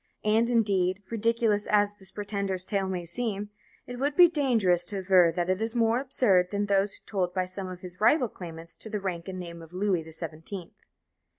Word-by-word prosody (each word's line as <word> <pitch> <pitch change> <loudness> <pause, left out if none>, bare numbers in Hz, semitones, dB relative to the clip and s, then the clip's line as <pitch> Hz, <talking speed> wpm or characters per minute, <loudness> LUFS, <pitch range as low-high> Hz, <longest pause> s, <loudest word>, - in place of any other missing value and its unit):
And, 225 +2 +3
indeed, 200 -4 +1
ridiculous 230 -2 +1
as 205 -1 +3
this 190 -1 -5
pretender's 200 -3 -2
tale 195 -2 -1
may 180 -2 -3
seem, 205 +2 -3 0.3
it 245 0 -7
would 285 +2 0
be 355 +1 +9
dangerous 235 - +2
to 200 +2 -3
aver 185 -3 +5
that 175 -1 0
it 185 +2 0
is 225 +2 -1
more 230 0 +3
absurd 210 -9 +2
than 205 +1 -1
those 200 0 +1
told 185 -4 -2
by 185 -1 +1
some 185 +1 -6
of 180 -1 -8
his 180 +1 -10
rival 255 +3 +4
claimants 165 -4 -8
to 220 - -5
the 210 -1 -2
rank 180 -3 -4
and 185 -1 -5
name 170 -1 -8
of 165 +1 -13
"Louis 185 -2 +1
the 160 0 -11
Seventeenth." 165 +3 -7
195 Hz, 200 wpm, -28 LUFS, 180-220 Hz, 0.3 s, be